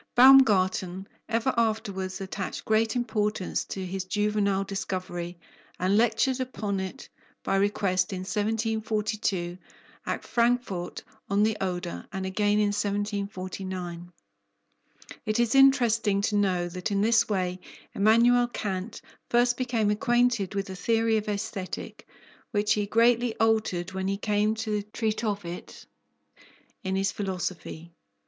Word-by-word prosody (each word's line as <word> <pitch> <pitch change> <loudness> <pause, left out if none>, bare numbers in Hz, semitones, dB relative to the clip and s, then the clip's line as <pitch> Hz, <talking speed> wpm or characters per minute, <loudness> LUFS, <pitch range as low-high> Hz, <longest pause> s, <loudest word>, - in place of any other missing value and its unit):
Baumgarten 195 -8 +5 0.2
ever 230 +3 +1
afterwards 205 -4 -1
attached 195 0 -5
great 220 +2 +2
importance 210 -5 -1
to 190 -1 -5
his 190 +1 -3
juvenile 205 0 0
discovery, 185 -3 -4 0.4
and 185 +2 +2
lectured 240 +4 +2
upon 215 -6 -2
it 190 +8 -6 0.4
by - - 0
request 195 -1 +1
in 185 -1 -4
1742, 215 -3 -1 0.5
at - - -2
Frankfort 235 -7 0 0.3
on 200 +1 +3
the 220 0 +2
Oder, 175 - -3
and 190 -1 -4
again 205 +2 +1
in 210 -1 +3
1749. 190 -4 -3 1.2
It 215 +1 +1
is 235 -1 +2
interesting 235 -7 +4
to 210 +1 0
know 185 -4 +1
that 180 +1 -4
in 200 -1 +1
this 225 +1 +3
way 185 -3 -1 0.3
Emmanuel 235 +4 +4
Kant 205 -2 -4 0.3
first 245 0 +3
became 240 -4 0
acquainted 240 -3 +1
with 195 0 -1
the 190 - -7
theory 225 +3 +2
of 215 0 -3
Aesthetic, 200 -2 -5 0.4
which 210 -1 +2
he 205 -1 -1
greatly 230 +2 +3
altered 215 -5 +1
when 190 0 -3
he 195 0 0
came 210 +1 +1
to 215 -2 -2
treat 215 +2 -3
of 205 -4 -2
it 170 +1 -8 1.0
in 190 0 -1
his 195 +1 +1
philosophy. 180 -3 -5
205 Hz, 125 wpm, -27 LUFS, 190-225 Hz, 1.2 s, Baumgarten